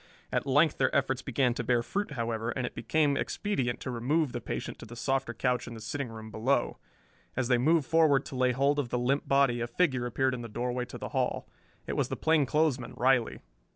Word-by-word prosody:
At -, -, -1 dB
length 145 Hz, +3 st, +3 dB
their 130 Hz, -, +2 dB
efforts 135 Hz, -1 st, +1 dB
began 130 Hz, -1 st, +1 dB
to -, -, -3 dB
bear 120 Hz, -1 st, +2 dB
fruit, 200 Hz, +3 st, -3 dB
however, 115 Hz, -2 st, -2 dB
and 125 Hz, +1 st, -2 dB
it -, -, -5 dB
became 150 Hz, -3 st, +1 dB
expedient 135 Hz, -, -1 dB
to 130 Hz, -, -4 dB
remove 135 Hz, +5 st, 0 dB
the 120 Hz, -, -4 dB
patient -, -, -5 dB
to -, -, -9 dB
the 120 Hz, -, -10 dB
softer 135 Hz, 0 st, -1 dB
couch 125 Hz, +1 st, -1 dB
in 120 Hz, -, -7 dB
the -, -, -8 dB
sitting 130 Hz, +4 st, -4 dB
room 110 Hz, -1 st, -9 dB
below. 120 Hz, +4 st, 0 dB, 0.6 s
As 130 Hz, -1 st, -1 dB
they 125 Hz, -2 st, +4 dB
moved 155 Hz, +3 st, +3 dB
forward 155 Hz, -4 st, +3 dB
to 140 Hz, -, -7 dB
lay 130 Hz, 0 st, +3 dB
hold 140 Hz, +3 st, +2 dB
of 130 Hz, -4 st, -2 dB
the 125 Hz, -, -1 dB
limp 130 Hz, +4 st, 0 dB
body 135 Hz, -3 st, +3 dB
a 120 Hz, -, -1 dB
figure 130 Hz, -2 st, +1 dB
appeared 130 Hz, +3 st, 0 dB
in 125 Hz, -, -4 dB
the 115 Hz, -, -7 dB
doorway 125 Hz, +2 st, -2 dB
to -, -, -9 dB
the -, -, -6 dB
hall. -, -, -1 dB, 0.4 s
It -, -, -3 dB
was -, -, 0 dB
the -, -, -3 dB
plainclothesman, 150 Hz, -4 st, +1 dB
Riley. 125 Hz, -2 st, +2 dB
130 Hz, 220 wpm, -29 LUFS, 120-140 Hz, 0.6 s, they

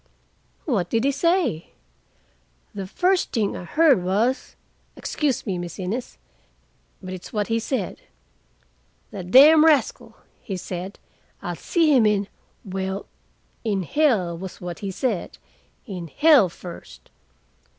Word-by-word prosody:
"What 200 Hz, -, 0 dB
did 225 Hz, 0 st, +1 dB
he 280 Hz, -, +3 dB
say?" 325 Hz, -, 0 dB, 1.0 s
"The 195 Hz, -2 st, -5 dB
first 365 Hz, -, +1 dB
thing 215 Hz, -4 st, 0 dB
I 180 Hz, -, -7 dB
heard 295 Hz, -, +4 dB
was—excuse 245 Hz, -, -2 dB
me, 190 Hz, -5 st, -2 dB
Miss 175 Hz, -1 st, -6 dB
Innes, 205 Hz, +7 st, -4 dB, 0.9 s
but 185 Hz, 0 st, -6 dB
it's 185 Hz, -1 st, -9 dB
what 210 Hz, -1 st, -2 dB
he 225 Hz, 0 st, +1 dB
said, 230 Hz, -4 st, -3 dB, 1.1 s
'The 190 Hz, -3 st, -7 dB
damned 295 Hz, -, +8 dB
rascal,' 310 Hz, -4 st, +2 dB, 0.2 s
he 195 Hz, -4 st, -5 dB
said, 180 Hz, +2 st, -6 dB, 0.5 s
'I'll -, -, -3 dB
see 320 Hz, -4 st, +2 dB
him 230 Hz, -4 st, +5 dB
in'—well, 195 Hz, -1 st, -4 dB, 0.6 s
in 205 Hz, -4 st, -1 dB
hell 210 Hz, -, +1 dB
was 185 Hz, +2 st, -8 dB
what 175 Hz, -1 st, -6 dB
he 200 Hz, -, -4 dB
said, 205 Hz, 0 st, -3 dB, 0.5 s
'in 180 Hz, -7 st, -6 dB
hell 280 Hz, -, +5 dB
first. 170 Hz, +1 st, -12 dB
205 Hz, 120 wpm, -23 LUFS, 185-270 Hz, 1.1 s, damned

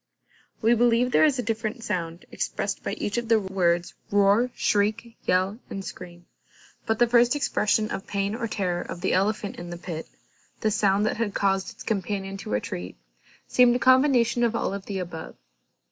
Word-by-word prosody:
We 230 Hz, +2 st, +5 dB
believe 240 Hz, +1 st, +3 dB
there -, -, +5 dB
is 290 Hz, -3 st, +2 dB
a 245 Hz, -, -1 dB
different 225 Hz, +1 st, -3 dB
sound 170 Hz, -5 st, -3 dB
expressed -, -, -3 dB
by -, -, -3 dB
each 205 Hz, +3 st, -2 dB
of 235 Hz, -, -6 dB
the 225 Hz, -1 st, +4 dB
words, 180 Hz, -3 st, 0 dB, 0.2 s
roar, 205 Hz, +4 st, +4 dB
shriek, 220 Hz, +3 st, 0 dB
yell, 185 Hz, +4 st, +1 dB
and 195 Hz, -1 st, -6 dB
scream: 175 Hz, -1 st, -9 dB, 0.6 s
but 220 Hz, 0 st, +1 dB
the 240 Hz, -, +5 dB
first 240 Hz, +2 st, +4 dB
expression 215 Hz, -6 st, +1 dB
of 195 Hz, -, -5 dB
pain 200 Hz, 0 st, -1 dB
or 230 Hz, 0 st, -3 dB
terror 180 Hz, -5 st, -1 dB
of 175 Hz, -, -7 dB
the 190 Hz, -, +1 dB
elephant 205 Hz, +2 st, 0 dB
in 175 Hz, 0 st, -7 dB
the 175 Hz, -, -6 dB
pit, 170 Hz, -2 st, -6 dB, 0.5 s
the 215 Hz, -, +1 dB
sound 205 Hz, 0 st, +2 dB
that -, -, -1 dB
had 220 Hz, -3 st, -2 dB
caused 195 Hz, -1 st, +1 dB
its -, -, -11 dB
companion 195 Hz, -2 st, -2 dB
to -, -, -8 dB
retreat, 90 Hz, -, -4 dB, 0.5 s
seemed 245 Hz, -1 st, +5 dB
a -, -, +3 dB
combination 255 Hz, -2 st, +4 dB
of 235 Hz, -1 st, +1 dB
all -, -, -1 dB
the 195 Hz, 0 st, -6 dB
above. 175 Hz, -3 st, -6 dB
205 Hz, 180 wpm, -25 LUFS, 190-235 Hz, 0.6 s, We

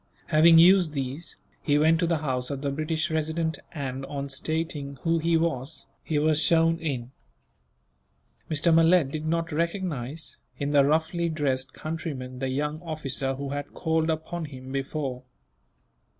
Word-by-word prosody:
Having 165 Hz, +1 st, +7 dB
used 175 Hz, -1 st, +6 dB
these, 135 Hz, +4 st, -4 dB, 0.3 s
he 145 Hz, -2 st, +2 dB
went 160 Hz, +2 st, +4 dB
to 170 Hz, -, +1 dB
the 165 Hz, -1 st, +2 dB
house 125 Hz, -2 st, -1 dB
of 140 Hz, -1 st, -4 dB
the 140 Hz, -, 0 dB
British 155 Hz, +3 st, -1 dB
Resident 160 Hz, 0 st, -1 dB
and, 135 Hz, -3 st, -4 dB
on 140 Hz, -1 st, -4 dB
stating 150 Hz, 0 st, -3 dB
who 165 Hz, 0 st, +2 dB
he 165 Hz, +1 st, +2 dB
was, 160 Hz, -3 st, -2 dB, 0.2 s
he 155 Hz, -, -1 dB
was 155 Hz, +1 st, +3 dB
shown 165 Hz, 0 st, +3 dB
in. 130 Hz, -6 st, -3 dB, 1.4 s
Mr. 160 Hz, +2 st, +2 dB
Malet 165 Hz, -3 st, +5 dB
did 155 Hz, +1 st, -4 dB
not 165 Hz, +1 st, 0 dB
recognize, 160 Hz, -4 st, -3 dB, 0.2 s
in 140 Hz, +1 st, -2 dB
the 145 Hz, -1 st, +5 dB
roughly 160 Hz, +4 st, +1 dB
dressed 135 Hz, -4 st, -1 dB
countryman, 145 Hz, -6 st, -5 dB
the 135 Hz, 0 st, -1 dB
young 150 Hz, +4 st, -2 dB
officer 140 Hz, -5 st, -3 dB
who 140 Hz, +1 st, -5 dB
had 145 Hz, +1 st, -5 dB
called 160 Hz, -1 st, 0 dB
upon 160 Hz, +1 st, -3 dB
him 130 Hz, -2 st, -9 dB
before. 135 Hz, -1 st, -3 dB
155 Hz, 150 wpm, -26 LUFS, 140-165 Hz, 1.4 s, Having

